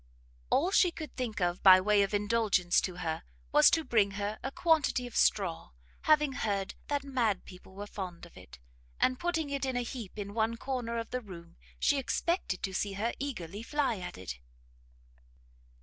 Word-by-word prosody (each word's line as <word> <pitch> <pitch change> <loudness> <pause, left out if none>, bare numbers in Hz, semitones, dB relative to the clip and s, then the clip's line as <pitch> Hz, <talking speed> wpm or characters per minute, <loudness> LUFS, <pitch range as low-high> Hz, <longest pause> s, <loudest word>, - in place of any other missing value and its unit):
All 345 +7 +2
she 370 -2 +5
could 320 -2 -8
think 240 -5 -3
of 175 0 0
by 185 -1 +9
way 205 +2 +3
of 195 - +1
indulgence 205 -4 +2
to 185 - -4
her, 160 0 -2 0.3
was - - +7
to 325 - +2
bring 210 -7 +2
her 205 +1 -3
a 270 - -4
quantity 310 -6 +2
of 245 - -9
straw, 185 - +1 0.4
having 300 -2 +4
heard 200 -7 -2
that 285 -1 -1
mad 240 -8 0
people 185 +1 -14
were 205 +1 -6
fond 185 -4 -7
of 170 - -17
it; - - -13 0.4
and 255 -1 +2
putting 325 -4 -1
it 280 0 -2
in 260 -1 -1
a 245 - 0
heap 230 -4 -7
in 200 -1 -5
one 225 +1 0
corner 245 -3 -3
of 230 -1 -4
the 250 - -2
room, 170 -5 -11 0.2
she 285 - +2
expected 275 - -1
to 190 - -2
see 200 +1 -1
her 215 +4 -1
eagerly 205 - -5
fly 265 -4 0
at 180 - -7
it. 90 -9 -7
220 Hz, 185 wpm, -31 LUFS, 190-270 Hz, 0.4 s, by